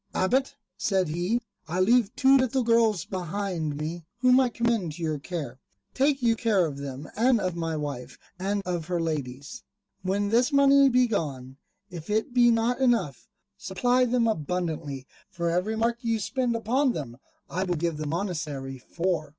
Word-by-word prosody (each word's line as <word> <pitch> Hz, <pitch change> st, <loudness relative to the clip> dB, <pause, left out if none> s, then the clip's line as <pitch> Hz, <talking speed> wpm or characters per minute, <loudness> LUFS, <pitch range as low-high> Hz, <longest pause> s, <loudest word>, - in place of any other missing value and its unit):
"Abbot," 265 Hz, +8 st, +1 dB, 0.2 s
said 190 Hz, -6 st, 0 dB
he, 175 Hz, +9 st, 0 dB, 0.3 s
"I 175 Hz, +3 st, -2 dB
leave 225 Hz, +3 st, +3 dB
two 270 Hz, 0 st, +5 dB
little 260 Hz, -1 st, +2 dB
girls 225 Hz, -6 st, +3 dB
behind 180 Hz, -4 st, -3 dB
me, 160 Hz, +3 st, -4 dB
whom 255 Hz, +1 st, +5 dB
I 260 Hz, -2 st, +3 dB
commend 230 Hz, -9 st, -1 dB
to 170 Hz, -, -7 dB
your 155 Hz, -2 st, -1 dB
care. 140 Hz, -6 st, -6 dB, 0.3 s
Take 275 Hz, 0 st, +1 dB
you 230 Hz, -1 st, +4 dB
care 215 Hz, -6 st, +2 dB
of 140 Hz, -3 st, -5 dB
them 140 Hz, +1 st, -6 dB
and 240 Hz, +2 st, +3 dB
of 185 Hz, -3 st, -2 dB
my 165 Hz, -2 st, -2 dB
wife 140 Hz, -4 st, -5 dB, 0.2 s
and 200 Hz, +2 st, -1 dB
of 175 Hz, -3 st, -2 dB
her 180 Hz, -1 st, -1 dB
ladies: 140 Hz, -4 st, -4 dB, 0.4 s
when 200 Hz, +2 st, 0 dB
this 245 Hz, +6 st, +3 dB
money 280 Hz, 0 st, +6 dB
be 250 Hz, 0 st, +4 dB
gone, 135 Hz, -, -3 dB, 0.3 s
if 170 Hz, -1 st, -8 dB
it 220 Hz, +3 st, 0 dB
be 240 Hz, -1 st, +5 dB
not 230 Hz, +2 st, +1 dB
enough, 235 Hz, -, +1 dB, 0.3 s
supply 245 Hz, +6 st, +1 dB
them 240 Hz, -1 st, +2 dB
abundantly; 160 Hz, -, -3 dB, 0.2 s
for 170 Hz, -1 st, -2 dB
every 180 Hz, +6 st, 0 dB
mark 230 Hz, +1 st, 0 dB
which 240 Hz, -, -18 dB
you 230 Hz, -1 st, +1 dB
spend 245 Hz, +3 st, -1 dB
upon 245 Hz, +4 st, +1 dB
them 125 Hz, -6 st, -6 dB, 0.3 s
I 185 Hz, -, -2 dB
will 180 Hz, -2 st, -1 dB
give 165 Hz, -1 st, -1 dB
the 155 Hz, 0 st, -4 dB
monastery 150 Hz, -6 st, -3 dB
four." 165 Hz, +2 st, -2 dB
190 Hz, 175 wpm, -26 LUFS, 155-235 Hz, 0.4 s, money